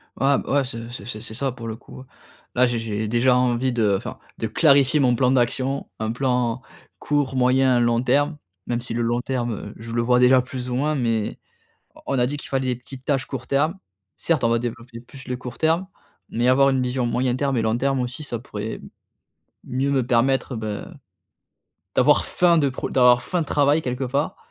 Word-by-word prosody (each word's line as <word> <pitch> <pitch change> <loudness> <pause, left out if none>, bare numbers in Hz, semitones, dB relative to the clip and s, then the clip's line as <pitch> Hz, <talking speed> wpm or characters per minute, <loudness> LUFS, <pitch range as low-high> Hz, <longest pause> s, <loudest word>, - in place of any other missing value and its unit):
Ah 140 +1 +2
bah - - -5
ouais, 140 -1 +3
c'est 115 -2 -7
c'est 110 -4 -8
c'est 110 -2 -6
c'est 110 - -7
ça 135 +4 -1
pour 120 -2 -8
le 110 - -4
coup. 130 +2 -13 0.5
Là, 125 +1 +5
j'ai 120 -1 -1
j'ai 110 -1 -3
déjà 120 +3 +3
envie 125 0 +1
de, 110 -5 +2
enfin, - - -7 0.2
de 115 - -1
clarifier 140 +1 +4
mon 125 -3 +3
plan 125 +1 +2
d'action. 130 +2 0
Un 110 0 -1
plan 125 -1 0 0.4
court, 145 -3 -1
moyen, 130 0 +3
long 120 0 +2
terme. 145 +5 +1 0.3
Même 120 0 -1
si 120 - -4
le 120 - -1
long 120 +1 0
terme, 120 -5 -3
je 115 +1 -9
le 120 0 0
vois 125 +1 +3
déjà 125 +1 +6
plus 125 0 -6
ou 125 - -2
moins 150 +4 0
mais 115 -5 -1 0.6
on - - -16
on - - +1
a 120 - +3
dit 145 +4 -3
qu'il - - -8
fallait 135 -1 -1
des - - -5
petites 130 +1 -11
tâches 135 -3 0
court 130 -2 -7
terme. 150 +6 +1 0.4
Certes 160 -7 0
on 115 - +3
va 115 0 +2
développer 120 0 -6
plus 130 +2 -13
le 125 - -2
court 125 -1 -8
terme 165 +4 +1 0.4
mais 120 +2 0
avoir 135 +2 +5
une 130 -1 +1
vision 125 0 -1
moyen 125 +1 0
terme 135 0 0
et - - +2
long 110 +1 +1
terme 135 +1 0
aussi 125 +4 -4
ça 120 -5 -4
pourrait 110 -2 -6 0.9
mieux 135 +3 -1
me 135 -3 +1
permettre, 130 +2 +1
bah, 110 +9 -5 1.1
d'avoir 145 +4 +4
faim 175 -2 +3
de 145 -3 +3
pro 130 - -5
d'avoir 125 -1 +5
faim 180 - -1
de 160 - -2
travail 145 +2 +3
quelque 125 0 -3
part. 140 +4 -1
125 Hz, 215 wpm, -23 LUFS, 120-135 Hz, 1.1 s, déjà